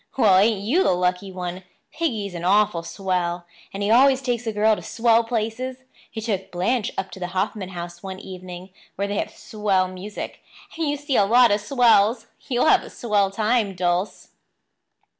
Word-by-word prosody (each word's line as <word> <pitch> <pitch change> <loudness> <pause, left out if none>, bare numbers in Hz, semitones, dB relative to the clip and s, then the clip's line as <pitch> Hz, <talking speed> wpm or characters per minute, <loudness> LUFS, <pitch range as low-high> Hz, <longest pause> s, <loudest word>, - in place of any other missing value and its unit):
"Well, 190 -7 +5
ain't 210 0 +2
you 260 - +2
the - - +3
lucky 180 +2 -1
one? 180 0 -5 0.3
Piggy's 220 - -2
an 170 -1 -6
awful 200 -1 +3
swell; 175 -1 -2 0.3
and 200 +1 -4
he 205 - +1
always 265 +2 +5
takes 245 -2 -2
a - - +1
girl 215 +1 +3
to - - -8
swell 230 0 +2
places. 235 +3 -3 0.3
He 225 - -7
took 205 -4 -3
Blanche 200 +6 -1
up 190 - -3
to - - -10
the 180 - -3
Hoffman 195 0 -2
House 175 -1 -8
one 190 -1 -7
evening, 185 0 -9 0.2
where 200 +1 -2
they 200 0 -2
have - - -2
swell 200 -4 -1
music, 185 +3 -7 0.3
and 320 -2 -1
you 290 - -1
see 285 -2 -1
a 200 - +5
lot 240 +2 +5
of 205 +1 +1
swells. 225 -1 +3 0.2
You'll 245 -2 +2
have - - +5
a - - -10
swell 205 -4 0
time, 215 0 0
Dulce." 180 +2 -1
205 Hz, 185 wpm, -23 LUFS, 185-230 Hz, 0.3 s, Well